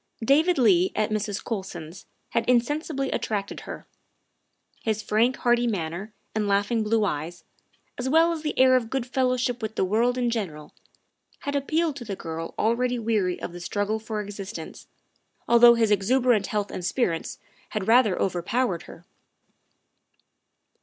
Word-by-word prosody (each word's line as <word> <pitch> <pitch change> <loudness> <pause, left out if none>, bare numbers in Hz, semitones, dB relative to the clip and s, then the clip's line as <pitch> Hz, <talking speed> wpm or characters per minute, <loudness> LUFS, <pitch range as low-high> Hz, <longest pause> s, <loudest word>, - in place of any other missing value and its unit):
David 315 +8 +4
Leigh 190 -8 +4
at 215 0 0
Mrs. 210 -1 -2
Colson's 190 -5 -6 0.2
had 230 - -1
insensibly 275 +3 0
at - - -1
tracted 200 -2 -3
her. - - -7 1.0
His 220 -1 -1
frank, 235 +5 +2
hearty 240 -1 +2
manner 190 0 -3 0.2
and 215 -1 -1
laughing 205 +3 +1
blue 215 0 +1
eyes, 170 0 -4 0.6
as 255 +1 -1
well 325 +3 +4
as 325 -2 -3
the 300 -1 -3
air 260 0 +6
of 235 -3 0
good 265 -1 -2
fellowship 255 -1 0
with 220 0 -4
the - - +1
world 235 +6 +1
in 245 -1 +1
general, 160 -10 -4 0.7
had 285 0 -3
appealed 310 +2 0
to 250 - -7
the 205 -4 -5
girl 165 -1 -6
already 245 +3 +1
weary 215 -6 0
of 175 - -6
the 175 - -8
struggle 205 +4 -2
for 220 -1 -4
existence, 205 +1 -8 0.6
although 235 0 +7
his 225 -2 +2
exuberant 220 +1 +2
health 205 -1 -2
and 180 - -5
spirits 175 -3 -1 0.3
had 210 -3 -3
rather 225 -5 +4
overpowered 185 +2 0
her. 170 - -13
220 Hz, 155 wpm, -25 LUFS, 195-250 Hz, 1.0 s, although